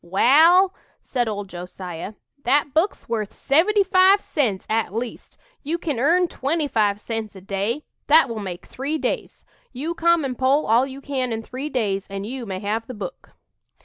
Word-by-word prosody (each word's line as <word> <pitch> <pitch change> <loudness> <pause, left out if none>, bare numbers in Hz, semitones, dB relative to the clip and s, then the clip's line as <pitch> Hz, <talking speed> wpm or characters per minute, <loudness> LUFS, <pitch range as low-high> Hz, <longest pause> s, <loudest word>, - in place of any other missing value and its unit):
"Wal," 320 - +5 0.3
said 245 -3 -1
old 205 -2 -3
Josiah, 180 +1 -7 0.3
"that 280 +2 +2
book's 335 +6 0
worth 220 -3 -2
seventy 390 +9 +3
five 380 +1 +5
cents, 240 - -1
at 220 -3 -1
least. 235 +1 -5 0.2
You 315 +4 -2
kin 300 -7 -3
earn 345 +7 +3
twenty 300 +1 -1
five 210 -5 +1
cents 220 -1 -5
a - - -9
day 200 +9 -2 0.2
that 305 -1 +6
will 230 -3 -5
make 185 -4 -6
three 285 +4 -3
days. - - -4 0.3
You 290 +7 -4
come 340 -2 +2
and 255 -2 -3
pull 270 +3 +3
all 235 +5 +3
you 270 0 -9
can 260 -3 -2
in 225 0 -3
three 260 +6 -5
days 200 -7 -1
and 195 0 -5
you 245 +1 -6
may 190 -1 -4
have 220 +2 -2
the 255 - -7
book." 355 - -8
255 Hz, 180 wpm, -23 LUFS, 210-305 Hz, 0.3 s, that